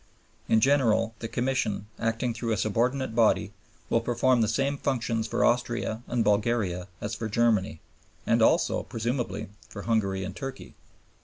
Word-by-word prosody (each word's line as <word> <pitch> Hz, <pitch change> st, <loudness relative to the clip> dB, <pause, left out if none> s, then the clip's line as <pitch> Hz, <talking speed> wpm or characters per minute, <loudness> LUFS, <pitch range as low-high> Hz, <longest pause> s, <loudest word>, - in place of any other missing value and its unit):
In 110 Hz, -, +4 dB
general, 115 Hz, -4 st, +3 dB
the 115 Hz, -, -4 dB
Commission, 120 Hz, -5 st, -1 dB
acting 115 Hz, +1 st, -1 dB
through 115 Hz, 0 st, -3 dB
a -, -, -1 dB
subordinate 120 Hz, +5 st, 0 dB
body, 110 Hz, -3 st, +2 dB, 0.3 s
will 115 Hz, -, +2 dB
perform 120 Hz, +1 st, +2 dB
the 110 Hz, -, +3 dB
same 135 Hz, +5 st, 0 dB
functions 115 Hz, -4 st, -1 dB
for -, -, +1 dB
Austria 120 Hz, -2 st, 0 dB
and 120 Hz, -2 st, +1 dB
Bulgaria 105 Hz, -4 st, +1 dB
as 105 Hz, -, -4 dB
for 110 Hz, 0 st, -4 dB
Germany, 105 Hz, -8 st, +1 dB, 0.4 s
and -, -, +3 dB
also, -, -, +3 dB
presumably, 120 Hz, -1 st, -3 dB, 0.2 s
for 100 Hz, -, -8 dB
Hungary 100 Hz, -4 st, 0 dB
and 95 Hz, 0 st, -6 dB
Turkey. 135 Hz, +1 st, -7 dB
115 Hz, 150 wpm, -27 LUFS, 105-120 Hz, 0.4 s, In